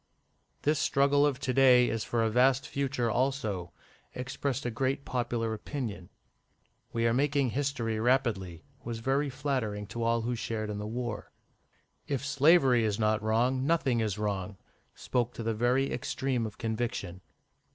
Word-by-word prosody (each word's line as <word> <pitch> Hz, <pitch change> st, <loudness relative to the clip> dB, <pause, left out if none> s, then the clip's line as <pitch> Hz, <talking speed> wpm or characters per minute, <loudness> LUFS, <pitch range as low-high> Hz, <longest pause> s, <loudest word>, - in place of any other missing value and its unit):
"This 150 Hz, 0 st, +2 dB
struggle 140 Hz, +1 st, +3 dB
of 135 Hz, -3 st, -2 dB
to 130 Hz, -2 st, -1 dB
day 125 Hz, -2 st, +6 dB
is 115 Hz, -1 st, -2 dB
for 115 Hz, -1 st, 0 dB
a 110 Hz, -, +2 dB
vast 130 Hz, +3 st, +3 dB
future 130 Hz, -4 st, -1 dB
also," 110 Hz, -9 st, -1 dB, 0.4 s
expressed 130 Hz, +1 st, -3 dB
a 120 Hz, -, -1 dB
great 135 Hz, +4 st, -1 dB
popular 120 Hz, -2 st, -1 dB
opinion. 110 Hz, -5 st, -5 dB, 0.8 s
"We 115 Hz, 0 st, 0 dB
are 115 Hz, -, +3 dB
making 140 Hz, -1 st, +1 dB
history 125 Hz, -5 st, -1 dB
rapidly," 110 Hz, -9 st, 0 dB, 0.2 s
was 115 Hz, -1 st, -4 dB
very 135 Hz, +5 st, 0 dB
flattering 130 Hz, -7 st, -2 dB
to 120 Hz, -, -4 dB
all 115 Hz, 0 st, +2 dB
who 120 Hz, +2 st, -2 dB
shared 110 Hz, -2 st, -3 dB
in 105 Hz, -, -4 dB
the 105 Hz, -, -4 dB
war. 120 Hz, 0 st, -4 dB, 0.8 s
"If 140 Hz, -1 st, -2 dB
slavery 140 Hz, -4 st, +4 dB
is 105 Hz, -2 st, 0 dB
not 110 Hz, -1 st, +1 dB
wrong, 120 Hz, +4 st, +1 dB
nothing 140 Hz, -7 st, +2 dB
is 105 Hz, -3 st, -1 dB
wrong," 100 Hz, -2 st, -3 dB, 0.4 s
spoke 125 Hz, -1 st, -1 dB
the 115 Hz, -1 st, -2 dB
very 125 Hz, +5 st, +1 dB
extreme 125 Hz, -1 st, -1 dB
of 110 Hz, +2 st, -11 dB
conviction. 110 Hz, -5 st, -3 dB
120 Hz, 150 wpm, -29 LUFS, 110-135 Hz, 0.8 s, day